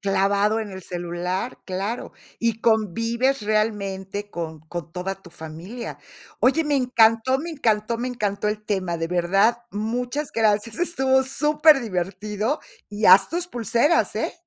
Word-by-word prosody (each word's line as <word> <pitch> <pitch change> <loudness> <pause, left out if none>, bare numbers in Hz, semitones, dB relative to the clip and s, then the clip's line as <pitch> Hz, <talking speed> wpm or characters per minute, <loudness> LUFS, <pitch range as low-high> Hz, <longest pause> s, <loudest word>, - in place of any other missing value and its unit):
Clavado 200 +2 +2
en 210 -2 -5
el 190 -1 -8
celular, 175 +5 -4
claro. 195 +5 -3 0.3
Y 230 -1 0
convives 230 +4 +1
realmente 205 -2 -2
con 160 -4 -5
con 165 +1 -7
toda 185 +2 -3
tu 175 - -15
familia. 170 +9 -8 0.4
Oye, 315 +5 +3
me 295 -1 +1
encantó, 245 0 +3
me 330 +4 -5
encantó, 230 -6 0
me 250 +1 -2
encantó 210 -4 -2
el 210 0 -3
tema, 185 -5 -1
de 165 0 -3
verdad, 195 +7 +2
muchas 245 +7 -3
gracias, 215 0 +1
estuvo 265 -7 +2
superdivertido, 235 - +1 0.3
y 210 +1 -4
haz 190 +1 +8
tus 345 +2 -2
pulseras, 240 - +1
¿eh? - - -1
215 Hz, 135 wpm, -23 LUFS, 190-245 Hz, 0.4 s, haz